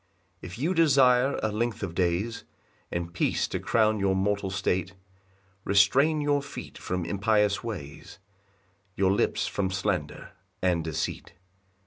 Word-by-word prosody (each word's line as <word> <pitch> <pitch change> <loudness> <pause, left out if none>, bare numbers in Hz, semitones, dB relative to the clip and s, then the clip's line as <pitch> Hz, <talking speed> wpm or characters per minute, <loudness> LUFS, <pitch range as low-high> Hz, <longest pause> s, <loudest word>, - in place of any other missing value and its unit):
2 - - -7
If 90 +4 -9
you 160 +9 0
desire 135 -5 +4
a 110 - 0
length 115 0 -2
of 90 -4 -4
days, 90 +6 -1 0.5
And 85 0 -4
peace - - 0
to - - -3
crown 110 -1 +2
your 95 -1 +1
mortal 100 0 0
state, 95 -1 -1 0.7
Restrain 135 +11 +3
your 145 -1 +1
feet 140 - -9
from 90 -1 -3
impious 105 +3 +1
ways, 90 -12 -7 0.8
Your 95 -1 +2
lips 100 - +1
from 95 -2 -1
slander 95 -5 -3 0.3
and 90 -3 +1
deceit. 80 +1 -4
100 Hz, 135 wpm, -27 LUFS, 95-115 Hz, 0.8 s, desire